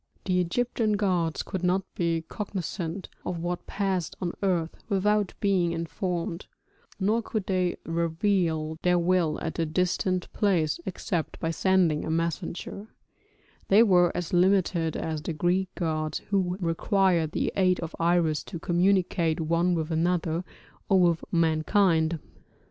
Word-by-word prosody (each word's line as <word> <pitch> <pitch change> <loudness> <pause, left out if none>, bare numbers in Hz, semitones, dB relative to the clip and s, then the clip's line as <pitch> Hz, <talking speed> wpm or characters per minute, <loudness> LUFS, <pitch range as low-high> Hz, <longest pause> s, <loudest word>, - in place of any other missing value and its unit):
The 185 -1 +2
Egyptian 220 +4 0
gods 180 -6 0
could 190 -3 -4
not 180 +2 +1
be 165 -2 0
cognisant 185 -3 -4 0.2
of 180 - -3
what 175 +1 -4
passed 190 -4 -1
on 175 -2 -2
earth 175 -5 0
without 205 0 +1
being 185 -4 +2
informed, 170 +2 -3 0.5
nor 215 +4 +2
could 215 -3 -3
they 185 -2 0
reveal 165 -1 0
their 180 0 +3
will 175 -2 +1
at 160 +1 -4
a 165 - +2
distant 180 +2 -1
place 175 -8 +1
except 175 -2 -3
by 165 - -1
sending 175 -3 +2
a - - -4
messenger; 170 +5 -3 0.8
they 205 +4 +6
were 180 -5 +4
as 175 -1 -4
limited 175 -3 +2
as 155 -2 -3
the 165 - -3
Greek 180 +4 +1
gods 155 -3 -1
who 185 -2 +1
required 175 -1 +1
the - - -1
aid 185 -2 +3
of 165 -1 -5
Iris 170 -2 +2
to - - -6
communicate 175 -2 +1
one 170 +2 +1
with 160 0 -2
another 165 0 0 0.5
or 195 -2 +5
with 170 -2 +3
mankind. 165 0 +2
175 Hz, 135 wpm, -27 LUFS, 165-190 Hz, 0.8 s, they